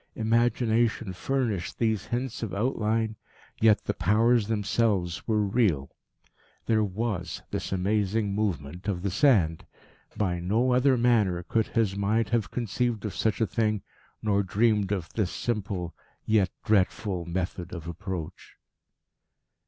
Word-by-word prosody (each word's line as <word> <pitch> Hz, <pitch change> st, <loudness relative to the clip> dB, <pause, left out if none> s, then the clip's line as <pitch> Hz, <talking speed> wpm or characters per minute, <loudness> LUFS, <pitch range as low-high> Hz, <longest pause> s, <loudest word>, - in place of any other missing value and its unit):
Imagination 115 Hz, -2 st, +1 dB
furnished 110 Hz, -1 st, -2 dB
these 110 Hz, -3 st, 0 dB
hints 125 Hz, 0 st, -3 dB
of 115 Hz, -4 st, -3 dB
outline, 110 Hz, -1 st, 0 dB, 0.4 s
yet 110 Hz, -2 st, +4 dB
the -, -, -1 dB
Powers 110 Hz, +5 st, +3 dB
themselves 100 Hz, -4 st, 0 dB
were 110 Hz, -2 st, +2 dB
real. 95 Hz, -, +1 dB, 0.7 s
There 110 Hz, -2 st, +2 dB
was 105 Hz, -2 st, -3 dB
this -, -, -3 dB
amazing 100 Hz, +2 st, 0 dB
movement 90 Hz, -4 st, -3 dB
of 95 Hz, -3 st, -2 dB
the 100 Hz, -, 0 dB
sand. 95 Hz, -, +3 dB, 0.5 s
By 90 Hz, -4 st, 0 dB
no 110 Hz, +9 st, +1 dB
other 130 Hz, +1 st, +4 dB
manner 110 Hz, -8 st, +2 dB
could 110 Hz, +4 st, 0 dB
his 110 Hz, -4 st, 0 dB
mind 100 Hz, +2 st, +1 dB
have 110 Hz, -5 st, 0 dB
conceived 120 Hz, +1 st, -1 dB
of 105 Hz, -, -3 dB
such 110 Hz, +1 st, 0 dB
a -, -, +4 dB
thing, 110 Hz, -2 st, 0 dB, 0.4 s
nor 100 Hz, -2 st, +2 dB
dreamed 105 Hz, 0 st, +1 dB
of 95 Hz, -5 st, -1 dB
this 105 Hz, -5 st, 0 dB
simple, 100 Hz, -8 st, -3 dB, 0.3 s
yet 105 Hz, -3 st, +3 dB, 0.2 s
dreadful 95 Hz, -3 st, +1 dB
method 90 Hz, 0 st, -3 dB
of 85 Hz, -3 st, -7 dB
approach. 85 Hz, -1 st, -6 dB
105 Hz, 130 wpm, -27 LUFS, 95-115 Hz, 0.7 s, yet